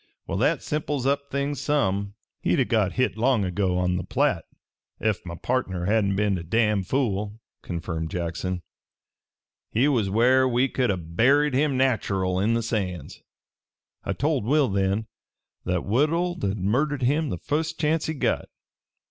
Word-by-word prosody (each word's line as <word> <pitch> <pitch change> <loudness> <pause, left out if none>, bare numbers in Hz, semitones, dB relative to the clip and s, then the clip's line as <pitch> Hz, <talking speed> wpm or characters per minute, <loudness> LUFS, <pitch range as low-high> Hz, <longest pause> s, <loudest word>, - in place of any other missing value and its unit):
"Well, - - -3
that - - +2
simples 150 -3 -2
up 140 +1 0
things 140 +1 -2
some." 100 -8 0 0.3
"He'd - - +1
o' - - +5
got 110 -5 +1
hit 130 -3 0
long 115 -3 +2
ago, 90 0 0
on 90 0 +1
the 90 - -3
Platte, - - 0 0.5
ef 110 -2 0
my 85 - -5
partner 95 -5 -2
hadn't 100 -1 +2
been 100 -2 +1
a - - -7
damned 105 +1 +1
fool," 105 -5 -1 0.2
confirmed 85 -2 -4
Jackson. 90 +1 -3 1.1
"He 125 +6 +2
was 115 -9 +1
where 125 +5 +4
we 125 +2 +2
could 125 -2 0
a' 95 - +1
buried 125 - +2
him 140 0 +2
nach'erl, 95 -8 +1
in 110 +4 +2
the 115 - 0
sands. 95 - -3 0.8
I - - -2
told 145 -3 0
Will 140 +3 +3
then 100 +2 0 0.6
that 90 -1 -1
Woodhull'd 155 - 0
murder 130 +10 +1
him 145 +4 +1
the 90 - -3
fust 155 - -2
chancet 155 +1 0
he - - -11
got. - - 0
110 Hz, 155 wpm, -25 LUFS, 95-140 Hz, 1.1 s, o